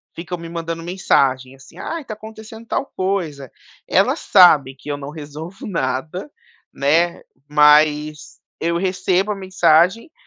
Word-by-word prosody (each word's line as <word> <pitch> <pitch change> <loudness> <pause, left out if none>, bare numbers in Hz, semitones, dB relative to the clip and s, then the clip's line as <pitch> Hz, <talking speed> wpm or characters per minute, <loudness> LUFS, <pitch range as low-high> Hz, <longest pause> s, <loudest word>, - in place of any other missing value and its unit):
ficam 180 +2 -5
me 165 0 -9
mandando 165 0 -5
mensagem 135 -7 0
assim: 130 -1 -17
"Ai 330 0 -4
está 230 - -7
acontecendo 220 +1 -11
tal - - -1
coisa", 170 -8 -3 0.4
ela - - +2
sabe 145 -7 +5
que 150 - -11
eu 145 - -3
não 145 +1 -8
resolvo 155 +6 -9
nada, 160 - -3 0.4
né, 165 +5 +1 0.3
mas 150 0 +3 0.2
eu 170 +1 0
recebo 185 +2 0
a - - -2
mensagem 185 - +2
165 Hz, 135 wpm, -19 LUFS, 150-190 Hz, 0.4 s, sabe